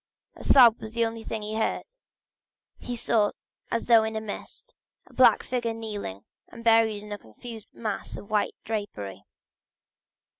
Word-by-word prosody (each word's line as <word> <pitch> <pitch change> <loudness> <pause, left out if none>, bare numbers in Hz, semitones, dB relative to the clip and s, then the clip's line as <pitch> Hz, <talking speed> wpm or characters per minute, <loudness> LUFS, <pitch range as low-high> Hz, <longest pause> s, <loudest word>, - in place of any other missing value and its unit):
A - - -11
sob 240 -4 +7
was 220 0 -7
the 235 0 +2
only 225 0 -5
sound 220 -1 -4
he 210 +1 -4
heard. 220 - 0 1.0
He 245 - -4
saw 220 -2 +2 0.4
as 230 - -1
though 230 -2 +6
in 220 0 -3
a - - 0
mist, 220 - -8 0.3
a - - -20
black - - +6
figure 235 -3 -2
kneeling 205 - -6 0.2
and 230 0 -12
buried 225 -2 +4
in 210 - -10
a 205 - -4
confused 220 - -11
mass 215 -3 -4
of 200 - -11
white 210 -1 +1
drapery. 200 - -5
220 Hz, 160 wpm, -27 LUFS, 210-230 Hz, 1.0 s, sob